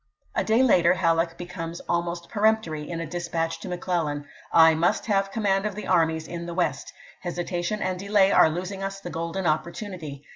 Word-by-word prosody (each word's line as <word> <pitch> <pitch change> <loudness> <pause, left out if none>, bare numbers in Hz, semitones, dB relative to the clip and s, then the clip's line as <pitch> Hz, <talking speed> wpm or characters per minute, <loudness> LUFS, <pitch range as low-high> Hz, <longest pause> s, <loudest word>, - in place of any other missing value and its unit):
A - - +1
day 225 +4 +3
later 180 -8 +5
Halleck 165 -2 +1
becomes 170 -1 -6
almost 170 0 -2
peremptory 210 -8 0
in 170 -1 -4
a 165 - -3
dispatch 165 0 -3
to - - -8
Mc 180 -1 -4
Clellan: 150 -5 -1 0.3
"I 160 -1 +7
must 165 +2 +1
have 195 -3 +1
command 200 -2 +1
of 205 - -5
the 210 - -6
armies 160 -3 +2
in 170 0 -6
the 170 - -5
West. 180 - -1 0.3
Hesitation 175 +3 -2
and 185 -1 -2
delay 200 0 +3
are 160 - +6
losing 185 +4 -4
us 195 0 -4
the 175 -3 -7
golden 170 +3 -3
opportunity. 160 - -3
175 Hz, 185 wpm, -25 LUFS, 165-195 Hz, 0.3 s, I